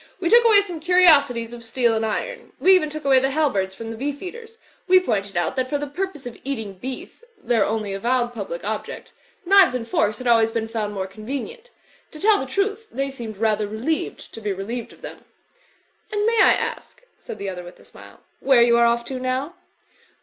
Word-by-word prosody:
We 345 0 -1
took 475 +1 +7
away 435 -3 +6
some 360 -5 -7
curiosities 290 -9 +4
of 235 -1 -8
steel 235 0 +1
and 225 0 0
iron. - - -4
We 380 - +6
even 360 -5 +3
took 305 -1 -7
away 270 -1 +5
the 265 +1 0
halberds 230 -11 0
from 225 +1 -7
the - - -6
Beef 285 +4 -4
eaters. 455 +4 -9 0.3
We 370 0 +7
pointed 200 - -2
out 175 - 0
that 255 0 -1
for 290 - 0
the 290 - -4
purpose 300 -1 -5
of 245 - -8
eating 225 -7 -4
beef 260 - -8
(their 240 - +1
only 215 -2 -2
avowed 240 +4 0
public 195 -6 -6
object) 220 - -5 0.3
knives 385 -6 +6
and 230 -2 -4
forks 215 -2 0
had 255 - -9
always 225 -2 +4
been 225 -1 -2
fotmd 215 -2 -3
more 190 -2 -3
con 215 +3 -12
venient. 435 - -5 0.5
To 305 - -10
tell 420 +3 +4
the 265 - -4
truth, 410 - -2
th^y 275 0 -2
seemed 230 -6 -8
rather 215 -1 +1
re 215 +1 -7
lieved 310 +8 -3
to 225 - -10
be 210 -1 -2
relieved 220 +5 -5
of - - -19
them." - - -9 0.9
"And 415 0 0
may 460 0 +3
I - - +7
ask," - - -4 0.2
said - - -8
the 200 -1 -4
other 180 -1 -6
with 175 - -13
a - - -18
smile, - - -14 0.2
''where 260 -3 +6
you 235 0 +4
are 235 - +5
off 235 0 0
to 260 +1 -5
now?" 260 +5 -2
255 Hz, 220 wpm, -22 LUFS, 220-335 Hz, 0.9 s, took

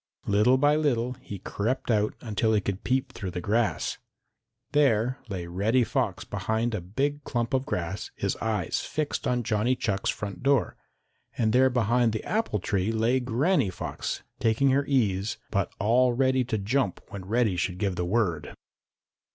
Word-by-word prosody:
Little 105 +6 +4
by 145 +2 +4
little 125 -5 +1
he 100 - -7
crept 115 +7 -2
out 105 -1 +1
until 110 0 0
he - - +4
could 100 +2 -4
peep 130 +1 0
through 95 - -5
the 90 - -4
grass. 110 +5 0 0.7
There 130 -3 +2
lay 90 -3 -4
Reddy 105 +8 +1
Fox - - -1
behind 110 +4 -1
a 105 - -2
big 140 +11 -2
clump 120 0 -2
of 130 +1 +1
grass, 90 - -3
his - - -1
eyes 105 -6 -1
fixed 150 0 -2
on 125 -1 +1
Johnny 110 +4 +1
Chuck's 100 -5 -1
front 100 -1 -4
door, 135 -3 +2 0.6
and 110 -2 +2
there 130 +1 +5
behind 120 -1 +2
the 110 - -3
apple 215 - 0
tree 100 +1 -1
lay 115 +3 +2
Granny 130 - +1
Fox 90 - -4 0.2
taking 120 +5 +3
her 140 +1 +2
ease, 110 -5 +1
but 100 -3 0
all 120 +4 +3
ready 130 +1 +2
to 115 -2 -1
jump 105 0 0
when 95 -2 -7
Reddy 110 -1 +1
should 90 +1 -1
give 95 -1 -1
the 90 - -1
word. 90 -6 -1
115 Hz, 170 wpm, -27 LUFS, 100-130 Hz, 0.7 s, there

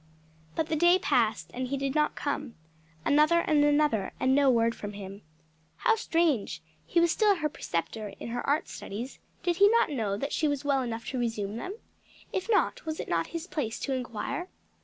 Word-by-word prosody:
But 320 - +1
the 320 - +1
day 345 +3 +5
passed 230 -11 +1
and 255 +1 -3
he 275 +2 -2
did 275 0 -1
not 300 0 +2
come; 285 -4 -3 0.5
another 305 +4 +5
and 300 -3 +3
another, 290 -8 +2
and 260 - +3
no 280 0 +5
word 230 -2 +3
from 205 -2 -7
him. 200 0 -8 0.6
How 450 - +3
strange! 330 - 0 0.2
he 345 - +2
was 340 -1 +4
still 420 +1 +4
her 305 -4 -1
preceptor 210 - -3
in - - -6
her 245 +1 -2
art 300 +3 +1
studies; 235 +7 -7 0.2
did 345 -2 +1
he 405 +1 +7
not 460 -7 +3
know 215 -7 -1
that 280 +6 -3
she 310 - +1
was 285 -1 -2
well 275 -2 +2
enough 230 -2 -4
to 260 - -3
resume 220 -3 -2
them? 375 - -5 0.6
If 380 +4 -2
not, 430 - +2
was 315 -1 -4
it - - -5
not 165 -1 +1
his 335 0 -5
place 265 -11 -3
to 270 - -1
inquire? 255 - -3
280 Hz, 200 wpm, -29 LUFS, 230-320 Hz, 0.6 s, he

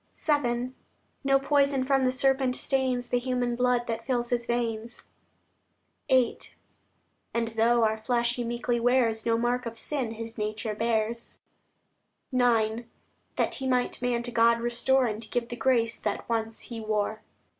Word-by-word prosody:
VII 250 -5 0 0.5
No 275 0 +4
poison 280 -1 +2
from 270 -1 +2
the 255 - +3
serpent 265 0 +1
stains 255 -2 -1
The 245 - +2
human 245 -1 -1
blood 250 0 +2
that 230 -1 -3
fills 240 -2 -1
His 240 -1 0
veins; 235 -1 -3 1.0
VIII 255 -3 +3 1.0
And 230 -1 0
though 230 +1 +3
our 220 0 +1
flesh 240 0 +1
He 245 - -2
meekly 240 0 -1
wears, 235 -2 +2
No 230 0 +3
mark 240 +1 0
of 230 0 -7
sin 255 -3 -2
His 225 0 -7
nature 215 +1 -2
bears; 230 +1 -1 1.0
IX 235 -2 +2 0.5
That - - 0
He 265 - -3
might 250 -1 0
man 245 -1 0
to 245 - -5
God 235 0 +4
restore, 245 +3 +2
And 215 -1 -4
give 235 -1 -2
the 240 - -4
grace 235 -3 +1
that 205 - -3
once 225 -1 -2
He 235 -2 -7
wore. 215 0 -1
240 Hz, 155 wpm, -27 LUFS, 230-250 Hz, 1.0 s, No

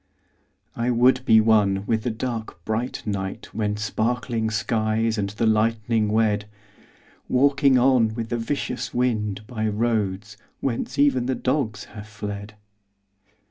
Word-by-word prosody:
I 120 +1 -1
would 125 +2 +3
be 110 -4 +6
one 105 -3 +3
with 110 0 0
the 120 - -2
dark 110 -6 -5
bright 115 +3 -3
night 95 -2 -4
When 105 -1 -1
sparkling 110 +2 -1
skies 110 +1 0
and 100 -1 -1
the 105 +3 -2
lightning 110 0 +2
wed— 105 -1 +1 0.8
Walking 135 0 +4
on 125 -4 +3
with 115 -1 -4
the 120 - -1
vicious 125 0 -3
wind 105 -5 -1
By 110 -2 -3
roads 105 -2 -1 0.2
whence 130 +1 -3
even 135 -3 +3
the 130 - 0
dogs 125 -5 -1
have 105 0 -11
fled. 105 -1 -7
110 Hz, 135 wpm, -24 LUFS, 105-125 Hz, 0.8 s, be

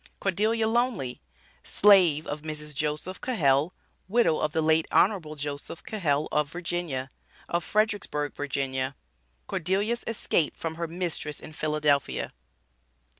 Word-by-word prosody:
CORDELIA 215 +4 +1
LONEY, 225 - 0 0.4
SLAVE 180 -7 +5
OF 145 +1 -4
MRS. 150 -1 -4
JOSEPH 150 +6 -3
CAHELL 150 - +2 0.4
(WIDOW 210 -6 +3
OF 155 - 0
THE 160 +1 +1
LATE 160 0 +3
HON. 200 0 +4 0.2
JOSEPH 145 +3 -6
CAHELL, 155 -8 0
OF 150 -1 +1
VA.), 170 -7 -3 0.4
OF 170 0 0
FREDERICKSBURG, 205 -9 0 0.4
VA. 130 +1 -2 0.5
CORDELIA'S 200 - 0
ESCAPE 195 -8 0
FROM 165 -1 -3
HER 170 0 -3
MISTRESS 165 -3 -2
IN 155 - -10
PHILADELPHIA. 150 -2 0
160 Hz, 120 wpm, -27 LUFS, 150-195 Hz, 0.5 s, SLAVE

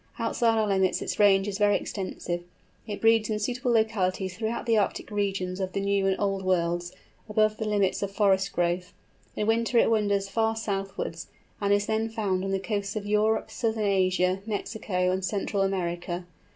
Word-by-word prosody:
Outside 230 -1 +1
our 215 -1 +2
limits 190 -2 +2
its - - -4
range 195 -1 +5
is 200 0 -3
very 205 -1 +4
extensive. 180 -3 -3 0.5
It 205 -2 -5
breeds 225 -1 +4
in 215 - 0
suitable 245 +3 -1
localities 195 -5 +1
throughout 225 +2 -3
the 230 -2 +3
Arctic 210 +1 0
regions 195 -3 -1
of 185 -1 -3
the - - -1
New 200 0 +1
and 190 - +2
Old 195 -1 0
Worlds, 175 -1 0 0.4
above 215 0 +2
the 220 - -3
limits 200 -3 +1
of 200 - -1
forest 195 -1 +2
growth; 175 +1 -1 0.4
in 210 - -1
winter 230 +2 +1
it 230 - +4
wanders 205 -3 +1
far 225 +2 0
southwards, 195 -6 -4 0.3
and 200 0 +1
is 205 0 +3
then 220 +1 0
found 200 -4 -1
on 195 - -2
the 195 - +1
coasts 200 0 -3
of 210 -1 -3
Europe, 210 +1 +1
Southern 220 -2 -1
Asia, 185 -1 +2
Mexico, 200 -3 -1
and 190 +1 -1
Central 200 +1 -1
America. 175 -2 -2
200 Hz, 180 wpm, -27 LUFS, 190-220 Hz, 0.5 s, range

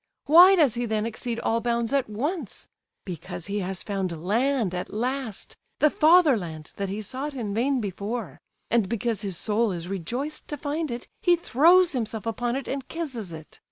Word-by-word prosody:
Why 355 +6 +8
does 300 - +4
he 240 0 -2
then 215 -1 0
exceed 230 +1 -4
all 230 +1 +1
bounds 235 +1 -1
at 275 -5 +1
once? 275 - -4 0.4
Because 175 -1 -6
he 200 +1 -2
has 190 -1 -4
found 185 -5 -3
land 230 -1 +1
at 180 - -4
last, 245 -1 -3 0.2
the 300 - +4
fatherland 245 - +3
that 200 -1 -2
he 210 +3 -4
sought 270 +7 -5
in 215 -6 -3
vain 260 +5 +1
before; 200 - -4 0.3
and, 225 -4 +2
because 230 -1 -1
his 195 -5 -3
soul 220 +2 +1
is 175 -1 -4
rejoiced 235 - -4
to 295 - -5
find 300 +3 -2
it, 240 0 -5
he 350 -1 +5
throws 340 +3 +5
himself 225 -4 -3
upon 240 +2 -1
it 270 - -4
and 270 -1 -4
kisses 260 - -5
it! 160 -1 -11
235 Hz, 180 wpm, -26 LUFS, 200-275 Hz, 0.4 s, Why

